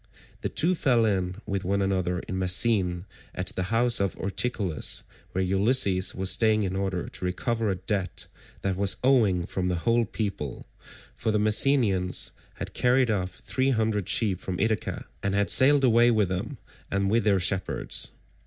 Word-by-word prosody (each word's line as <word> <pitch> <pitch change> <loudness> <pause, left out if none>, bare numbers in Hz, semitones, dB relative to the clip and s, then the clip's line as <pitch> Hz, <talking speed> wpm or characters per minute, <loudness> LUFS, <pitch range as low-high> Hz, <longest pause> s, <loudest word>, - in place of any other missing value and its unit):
The - - -2
two 175 +3 +2
fell 125 -9 +2
in 95 -4 -1
with 100 -1 -3
one 100 +2 0
another 95 -2 -1
in 95 - -5
Messene 90 -1 +2 0.3
at 90 0 -2
the 90 - -2
house 120 +1 +3
of 100 -2 -1
Ortilochus, 100 -4 -1 0.3
where 95 - 0
Ulysses 95 -1 +2
was 95 0 +3
staying 110 -2 +2
in 95 -1 -3
order 95 -2 -2
to - - -9
recover 110 +5 -1
a 95 - 0
debt 95 0 -3 0.4
that 95 -1 -1
was 100 0 +1
owing 110 -10 +3
from 90 0 -3
the 90 - 0
whole 115 0 +3
people; 100 - -5 0.5
for - - -3
the 105 - +1
Messenians 105 -4 +2 0.2
had - - -7
carried 125 -1 +2
off 95 -3 -3
three 130 0 0
hundred 110 -6 0
sheep 100 -6 +1
from 90 -2 -5
Ithaca, 110 0 -2 0.2
and 100 0 -1
had 100 0 +1
sailed 140 +2 +5
away 120 -1 +5
with 110 -5 +2
them 90 -1 -4 0.3
and 100 0 0
with 115 +1 +2
their 100 -3 +2
shepherds. 95 +1 -1
100 Hz, 170 wpm, -26 LUFS, 95-115 Hz, 0.5 s, sailed